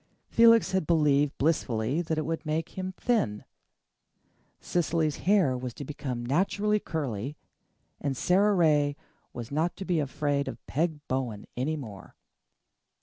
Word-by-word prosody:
Felix 230 0 +6
had 190 -5 0
believed 150 -3 +3
blissfully 135 -2 +1
that 160 -2 -2
it 155 - -1
would 165 0 -3
make 155 +1 -2
him 185 0 -5
thin. 180 - 0 1.1
Cecily's 165 -3 0
hair 185 -11 +4
was 125 -2 -5
to 145 - -7
become 130 -4 -4
naturally 200 +9 +1
curly, 140 - -4 0.6
and 140 -3 -2
Sara 200 +6 +3
Ray 150 -4 +3 0.4
was 120 +1 -7
not 160 +4 0
to 195 - -7
be 175 -3 +1
afraid 145 0 -1
of 115 - -7
Peg 155 0 -2
Bowen 125 -6 -2
any 140 +6 -1
more. 110 -10 -9
150 Hz, 140 wpm, -28 LUFS, 130-175 Hz, 1.1 s, Felix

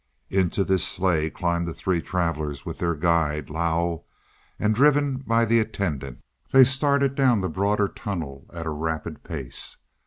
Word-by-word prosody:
Into 95 0 +1
this 95 -1 +2
sleigh 85 -4 +1
climbed 85 +1 -1
the 85 - -5
three 90 -3 -1
travelers 80 -6 -2
with - - -6
their 85 -1 0
guide 80 -2 0
Lao; 85 +1 -1 0.5
and, 105 +1 +1
driven 145 +2 +3
by 115 -3 +1
the 115 +1 +3
attendant, 80 - -3 0.3
they 135 0 +8
started 140 +1 +3
down 130 -6 +3
the 95 - -1
broader 100 +4 +1
tunnel 80 -11 -6
at 85 -1 -6
a 80 - -2
rapid 80 0 -4
pace. 70 -7 -4
85 Hz, 155 wpm, -24 LUFS, 80-110 Hz, 0.5 s, they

